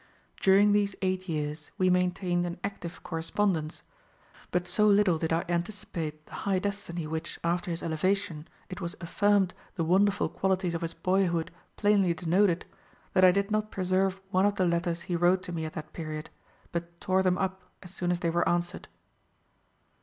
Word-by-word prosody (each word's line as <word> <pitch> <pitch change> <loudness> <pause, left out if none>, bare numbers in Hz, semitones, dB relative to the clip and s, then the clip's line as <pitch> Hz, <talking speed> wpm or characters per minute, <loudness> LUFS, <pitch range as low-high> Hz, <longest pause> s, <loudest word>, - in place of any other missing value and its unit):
During 200 +2 +6
these 205 -1 +2
eight 185 0 -1
years 150 -1 -3
we 185 -1 +3
maintained 180 -1 +1
an 175 - -6
active 185 -4 -6
correspondence; 165 -1 -1 0.7
but 180 0 -1
so 210 +4 +3
little 200 -5 +4
did 160 0 -1
I 165 +1 +1
anticipate 170 -4 -3
the - - -17
high 195 -1 +1
destiny 185 -4 -3
which, 160 +2 -4
after 170 +1 0
his 165 -1 -3
elevation, 170 0 -1 0.2
it 185 +1 -7
was 170 -1 -4
affirmed 200 +2 +2 0.2
the 170 - 0
wonderful 195 +4 +3
qualities 190 -2 0
of 170 - -2
his 165 0 -3
boyhood 180 -3 +1 0.3
plainly 200 -4 +3
denoted, 175 +2 +2 0.5
that 185 - +4
I 185 - +9
did 200 +2 0
not 215 0 0
preserve 190 0 0
one 190 +1 +4
of 205 - 0
the 185 - +2
letters 170 0 0
he 180 - -2
wrote 175 +2 +3
to 180 - -6
me 160 -2 -3
at 155 - -6
that 155 0 -7
period, 155 -2 -6 0.4
but 170 0 -5
tore 190 0 +2
them 185 -1 +2
up 190 -1 -2 0.2
as 180 0 -12
soon 175 -2 -2
as 175 0 0
they 170 - +1
were 175 +1 +2
answered. 175 0 -1
180 Hz, 175 wpm, -29 LUFS, 170-195 Hz, 0.7 s, I